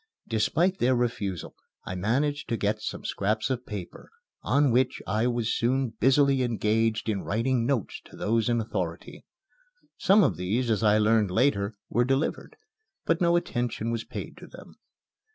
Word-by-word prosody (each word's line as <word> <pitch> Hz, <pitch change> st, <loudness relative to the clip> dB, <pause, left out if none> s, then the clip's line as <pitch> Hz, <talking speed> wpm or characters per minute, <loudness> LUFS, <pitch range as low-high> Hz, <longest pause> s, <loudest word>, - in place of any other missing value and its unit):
Despite 160 Hz, -, +1 dB
their 125 Hz, +2 st, +3 dB
refusal 110 Hz, -8 st, -2 dB, 0.3 s
I -, -, -5 dB
managed 135 Hz, +10 st, -1 dB
to 115 Hz, -, 0 dB
get 105 Hz, 0 st, -1 dB
some -, -, -5 dB
scraps 110 Hz, +5 st, -1 dB
of 125 Hz, -1 st, -3 dB
paper, 100 Hz, -5 st, -8 dB, 0.3 s
on 140 Hz, -2 st, +2 dB
which 125 Hz, +2 st, +1 dB
I 110 Hz, +5 st, 0 dB
was 120 Hz, -2 st, 0 dB
soon 130 Hz, +1 st, 0 dB
busily 135 Hz, +1 st, +4 dB
engaged 115 Hz, -1 st, 0 dB
in 105 Hz, -3 st, -1 dB
writing 115 Hz, +2 st, 0 dB
notes 130 Hz, -7 st, -2 dB
to -, -, -14 dB
those 115 Hz, +1 st, 0 dB
in 120 Hz, -1 st, +2 dB
authority. 90 Hz, -6 st, -5 dB, 0.7 s
Some 200 Hz, +2 st, +5 dB
of 145 Hz, -, +1 dB
these 115 Hz, +7 st, -1 dB
(as 110 Hz, -, +1 dB
I 105 Hz, -1 st, +4 dB
learned 110 Hz, -1 st, +3 dB
later) 105 Hz, -1 st, +1 dB
were 120 Hz, -, +1 dB
delivered, 135 Hz, +4 st, -1 dB, 0.5 s
but 165 Hz, +1 st, +1 dB
no 170 Hz, -1 st, +4 dB
attention 120 Hz, -8 st, -1 dB
was 115 Hz, -1 st, -2 dB
paid -, -, -8 dB
to -, -, -12 dB
them. -, -, -13 dB
115 Hz, 160 wpm, -27 LUFS, 105-130 Hz, 0.7 s, Some